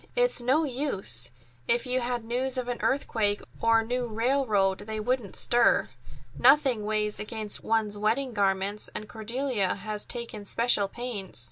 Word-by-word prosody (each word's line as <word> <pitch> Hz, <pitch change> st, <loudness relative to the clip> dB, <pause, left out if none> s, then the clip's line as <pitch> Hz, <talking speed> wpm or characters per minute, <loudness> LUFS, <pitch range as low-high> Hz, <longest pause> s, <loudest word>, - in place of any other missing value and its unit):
"It's -, -, +3 dB
no 265 Hz, +7 st, +2 dB
use. 200 Hz, -, +1 dB, 0.4 s
If 240 Hz, +1 st, +1 dB
you 255 Hz, 0 st, 0 dB
had 240 Hz, -1 st, -2 dB
news 255 Hz, +3 st, -2 dB
of 250 Hz, -1 st, -2 dB
an 245 Hz, -1 st, -3 dB
earthquake 215 Hz, -6 st, 0 dB, 0.2 s
or 230 Hz, 0 st, +4 dB
a -, -, -6 dB
new 245 Hz, +1 st, -1 dB
railroad, 220 Hz, -4 st, +1 dB
they 220 Hz, 0 st, -5 dB
wouldn't 240 Hz, -2 st, -2 dB
stir. 240 Hz, 0 st, +3 dB, 0.5 s
Nothing 260 Hz, -8 st, +4 dB
weighs 210 Hz, 0 st, -1 dB
against 215 Hz, -1 st, -2 dB
one's 215 Hz, -2 st, +1 dB
wedding 235 Hz, +5 st, 0 dB
garments, 200 Hz, 0 st, 0 dB
and 215 Hz, -, -4 dB
Cordelia 225 Hz, -2 st, -1 dB
has 210 Hz, +1 st, -5 dB
taken 235 Hz, -4 st, -5 dB
special 220 Hz, -1 st, +1 dB
pains." 220 Hz, -, -5 dB
225 Hz, 150 wpm, -27 LUFS, 210-250 Hz, 0.5 s, or